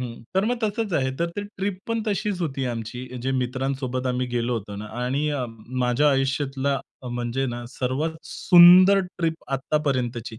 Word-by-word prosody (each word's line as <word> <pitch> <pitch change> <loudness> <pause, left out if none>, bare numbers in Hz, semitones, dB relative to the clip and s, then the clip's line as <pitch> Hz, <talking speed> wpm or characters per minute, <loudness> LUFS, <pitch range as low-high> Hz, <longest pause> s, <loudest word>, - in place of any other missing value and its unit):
हं, 120 -2 -6
तर 190 - +3
मग 245 +3 0
तसंच 210 -2 -1
आहे, 130 -3 +1
तर 170 - +1
ते 205 - -2
ट्रिप 200 -2 -4
पण 230 -1 0
तशीच 200 -2 -1
होती 135 -4 -2
आमची, 120 +1 -5 0.2
जे 130 - -1
मित्रांसोबत 130 0 -2
आम्ही 125 0 -1
गेलो 120 0 -1
होतो 100 -1 -9
ना. 105 - -6 0.2
आणि 140 +4 0
अ, 140 -4 -1 0.4
माझ्या 130 +5 +3
आयुष्यातला 135 0 0 0.3
म्हणजे 120 +2 -2
ना, 120 0 -5
सर्वात 135 +6 -2 0.2
सुंदर 185 +2 +8 0.2
ट्रिप 165 -3 -2
आत्तापर्यंतची. 130 -5 -1
135 Hz, 160 wpm, -24 LUFS, 125-170 Hz, 0.4 s, सुंदर